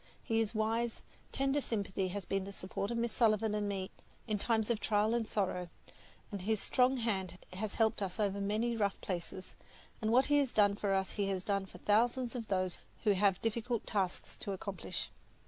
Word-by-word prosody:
His 225 -1 0
wise, 225 +2 0 0.3
tender 275 +1 +1
sympathy 200 -5 -1
has 190 0 -4
been 195 -1 0
the 200 - -6
support 195 +1 -4
of 235 - -1
Miss 235 0 0
Sullivan 220 -2 +3
and 205 -1 0
me 190 -2 -3 0.3
in 215 -3 -1
times 225 +1 +2
of 225 - +1
trial 210 +1 +2
and 235 -2 0
sorrow, 185 -4 -1 0.6
and 200 -2 -4
his 215 +2 +1
strong 255 +4 +3
hand 195 -6 -1 0.2
has 200 +3 -3
helped 220 -2 +2
us 190 +1 -3
over 200 -1 +1
many 220 +4 +1
rough 200 -3 0
places; 185 0 -5 0.5
and 220 0 +1
what 255 +3 +6
he 290 0 +4
has 275 -4 +1
done 205 -1 +5
for 200 -1 -1
us 190 0 0
he 200 -1 -1
has 190 -2 -1
done 200 -1 0
for - - -12
thousands 240 +4 +2
of 235 -3 -4
those 185 -2 0 0.2
who 215 - +5
have 195 -1 +3
difficult 230 +1 -1
tasks 190 -4 -1
to 200 - -3
accomplish. 195 +1 -4
210 Hz, 195 wpm, -34 LUFS, 195-230 Hz, 0.6 s, what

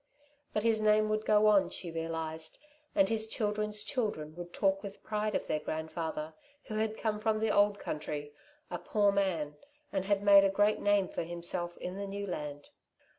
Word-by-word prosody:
But 210 - -1
his 225 -1 +3
name 215 0 +4
would 215 0 0
go 210 0 +5
on, 205 -3 +5
she 170 - -3
realised, 160 -1 -2 0.4
and 295 -2 +5
his 220 -1 +1
children's 210 -1 -1
children 205 - -2
would 175 0 -8
talk 195 +1 +1
with 200 -1 -9
pride 210 -1 -1
of - - -1
their 155 - 0
grandfather 160 0 -4 0.3
who - - -8
had 220 0 -1
come 215 -2 -1
from 215 0 +1
the 215 -1 +1
old 205 0 +4
country, 145 -3 -5 0.4
a 175 - -3
poor 205 -2 +2
man, 170 -7 0 0.4
and 190 -1 0
had 200 0 +1
made 200 -1 +8
a 195 - +4
great 205 +2 +2
name 205 -2 +3
for - - -4
himself 175 +1 -4
in 180 +1 -5
the 200 0 -4
new 200 +1 -4
land. 150 -6 -6
200 Hz, 185 wpm, -32 LUFS, 165-215 Hz, 0.4 s, made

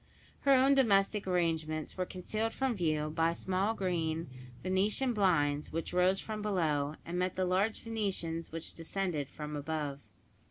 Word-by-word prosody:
Her 275 - +4
own 265 +2 +5
domestic 205 -6 +3
arrangements 160 -4 0
were 185 -1 -2
concealed 215 +5 -2
from 265 -3 0
view 155 -4 0
by 165 +1 +2
small 190 +5 0
green 165 -5 -1 0.3
venetian 205 +7 +1
blinds, 150 -8 +2
which 165 +2 -3
rose 180 +2 +3
from 215 -1 -5
below, 155 -8 0
and 175 +1 -3
met 185 0 0
the 185 - +1
large 195 +4 +1
venetians 195 -7 -2
which 165 0 -5
descended 165 -4 -2
from 150 +1 -6
above. 145 -1 -3
180 Hz, 150 wpm, -32 LUFS, 160-200 Hz, 0.3 s, own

